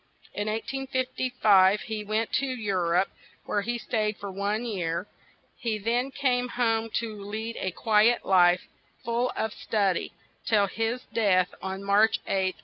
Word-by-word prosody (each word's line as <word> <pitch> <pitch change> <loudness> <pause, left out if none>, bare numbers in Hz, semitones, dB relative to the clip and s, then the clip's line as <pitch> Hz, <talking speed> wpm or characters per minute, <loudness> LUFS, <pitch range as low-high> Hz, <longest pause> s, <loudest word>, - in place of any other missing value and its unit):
In 205 +1 -3
1855 250 -4 +2
he 220 -2 -4
went 215 +2 -1
to 275 - +2
Eu 225 -6 -2
rope, 180 +1 +2 0.4
where 205 - 0
he 240 +3 -2
stayed 215 -3 -1
for 200 -1 -6
one 205 +4 -2
year; 180 -5 -2 0.5
he 230 -5 -2
then 235 +5 0
came 250 -2 0
home 225 -2 0
to 220 -3 -3
lead 220 +3 -5
a 190 - -1
qui 215 +4 +4
et 240 - -1
life, 180 -1 +5 0.4
full 235 +2 0
of 220 -1 -2
stud 200 -5 0
y, - - -4 0.3
till 210 -3 +3
his 225 +5 -2
death 185 -5 +2
on 190 +1 -5
March 205 +3 +4
8th, 190 -1 0
1874. - - -27
215 Hz, 160 wpm, -27 LUFS, 195-235 Hz, 0.5 s, life